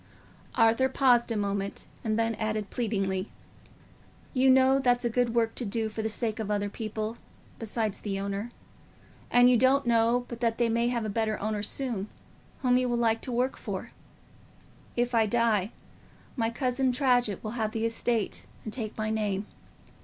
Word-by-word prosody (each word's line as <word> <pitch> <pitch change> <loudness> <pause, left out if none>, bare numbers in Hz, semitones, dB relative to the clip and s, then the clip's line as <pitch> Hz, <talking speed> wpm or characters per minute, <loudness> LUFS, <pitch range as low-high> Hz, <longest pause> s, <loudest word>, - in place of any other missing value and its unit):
Arthur 230 +3 +4
paused 245 -3 +3
a 225 - 0
moment 200 -1 -2 0.2
and 215 -1 0
then 230 0 +1
added, 215 -1 -3
pleadingly, 195 -4 -1 1.0
"You 265 0 +4
know 265 +1 +5
that's 245 -2 +2
a 235 - +1
good 240 0 +1
work 225 -1 +2
to - - -4
do 220 +1 -1
for 220 +1 -4
the 220 - -1
sake 220 0 -1
of 215 -2 -3
other 205 -1 -1
people, 220 0 -4 0.4
besides 220 -2 -2
the 195 -2 -3
owner. 200 +3 -3 0.8
And 245 0 +6
you 250 -1 +5
don't 260 +3 +4
know 235 +1 +3
but 235 - -7
that 230 -1 0
they 235 -1 +2
may 235 +1 +1
have 240 -2 -1
a - - -1
better 215 0 -1
owner 210 0 -2
soon, 215 -2 -3 0.5
whom 250 -1 +4
you 250 0 +1
will 240 - +1
like 225 -1 +2
to 255 - -5
work 250 +2 0
for. - - -5 1.0
If 245 +1 0
I 225 -2 +4
die, 220 -2 +2 0.6
my 225 -4 +1
cousin 255 +1 0
Tradgett 245 -6 +1
will 215 - -4
have 220 -2 -2
the 225 0 -1
estate 230 -1 -1 0.2
and 215 - -5
take 225 -4 -5
my 215 0 -1
name. 210 -2 -1
230 Hz, 175 wpm, -28 LUFS, 215-245 Hz, 1.0 s, And